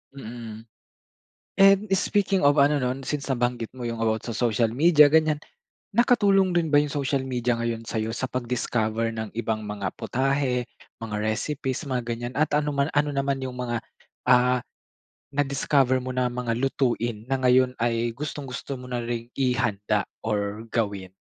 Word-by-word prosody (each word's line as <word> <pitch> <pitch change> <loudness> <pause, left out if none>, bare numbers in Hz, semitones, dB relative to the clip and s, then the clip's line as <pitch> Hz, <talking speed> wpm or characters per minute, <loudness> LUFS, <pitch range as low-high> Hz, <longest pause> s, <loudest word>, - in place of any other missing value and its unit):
Mm. 115 -3 -8 0.9
And 195 0 +7
speaking 195 -1 +2
of 145 +1 +5
ano 145 +1 +3
nun, 130 +2 -2
since, 145 0 -3
nabanggit 120 -3 -1
mo 125 - -7
yung 115 -1 -3
about 110 -1 0
sa 120 - -4
social 115 -1 +1
media 150 +2 +6
ganyan. 155 -2 +4 0.6
Nakatulong 205 -6 +4
rin 170 -2 +1
ba 145 - +1
yung 145 -1 +2
social 140 -2 -1
media 125 -2 0
ngayon 115 -1 -3
sa'yo 110 0 -2
sa 130 +3 -3
pag-discover 115 -2 -1
ng 110 -1 -4
ibang 110 -1 -2
mga 105 -2 -4
putahe, 130 -2 0 0.3
mga 110 -2 -5
recipes, 135 +5 -2
mga 125 -2 -1
ganyan 120 +1 -4
at 155 0 +1
ano 150 0 +1
man 140 +2 +1
ano 145 -1 +1
naman 140 0 0
yung 130 -1 -5
mga 120 -2 -2 0.5
ah, 125 0 +5 0.7
na 145 +1 +1
discover 135 -1 +2
mo 130 - -5
na 125 0 0
mga 120 -1 -2
lutuin 120 -4 0
na 135 - +2
ngayon 130 0 +3
ay 115 0 0
gustong-gusto 140 +1 -5
mo 125 -1 -9
na 125 - -1
ring 120 0 -4
ihanda 110 -6 +1 0.2
or 105 +1 -2
gawin? 100 -5 -1
125 Hz, 160 wpm, -25 LUFS, 115-140 Hz, 0.9 s, And